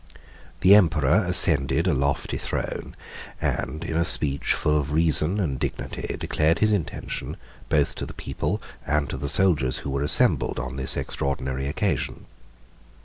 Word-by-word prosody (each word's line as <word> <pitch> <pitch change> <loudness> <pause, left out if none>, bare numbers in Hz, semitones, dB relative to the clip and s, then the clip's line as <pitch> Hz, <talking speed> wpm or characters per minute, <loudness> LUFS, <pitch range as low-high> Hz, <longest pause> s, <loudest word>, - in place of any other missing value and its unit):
The 95 +2 +7
emperor 85 -1 +4
ascended 80 -4 +4
a 90 - +2
lofty 70 +1 -1
throne, - - -5 0.4
and 80 - -3
in 80 - -4
a 85 - +2
speech, 70 -4 +3
full 75 - 0
of 75 -1 -1
reason 80 +4 +2
and 70 -9 -2
dignity, - - -4
declared 80 +2 +1
his 110 0 +2
intention, 100 -7 -3 0.3
both - - +1
to - - -4
the - - -10
people - - -3 0.2
and 75 -1 0
to - - -4
the 70 +1 -3
soldiers 75 -6 +2
who 70 - -3
were 70 0 -2
assembled 75 - +2
on 65 0 -5
this 65 -1 -2
extraordinary 65 -1 -3
occasion. 70 - -2
75 Hz, 150 wpm, -24 LUFS, 70-85 Hz, 0.4 s, The